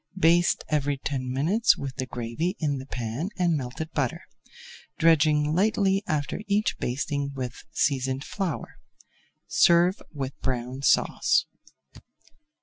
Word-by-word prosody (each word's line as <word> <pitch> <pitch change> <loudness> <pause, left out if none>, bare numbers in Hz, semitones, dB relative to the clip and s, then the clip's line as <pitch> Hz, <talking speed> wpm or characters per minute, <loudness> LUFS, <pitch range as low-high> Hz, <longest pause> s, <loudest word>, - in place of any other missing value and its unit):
Baste 175 0 +3
every 145 -2 0
ten 130 -2 -3
minutes 170 - +3
with 135 -2 -6
the 130 - -3
gravy 120 - -3
in 145 -4 -1
the 135 - -9
pan 125 - -3
and 175 -3 +2
melted 145 +4 -5
butter, 135 -6 -2 0.7
dredging 155 -2 +4
lightly 195 +1 +2
after 150 +5 -2
each 205 +1 +1
basting 140 +2 -2
with 125 -2 -5
seasoned 135 -1 0
flour. 190 -4 -4 0.7
Serve 175 +2 +4
with 135 -3 -4
Brown 125 +1 -3
Sauce. 140 - +3
145 Hz, 120 wpm, -26 LUFS, 130-170 Hz, 0.7 s, dredging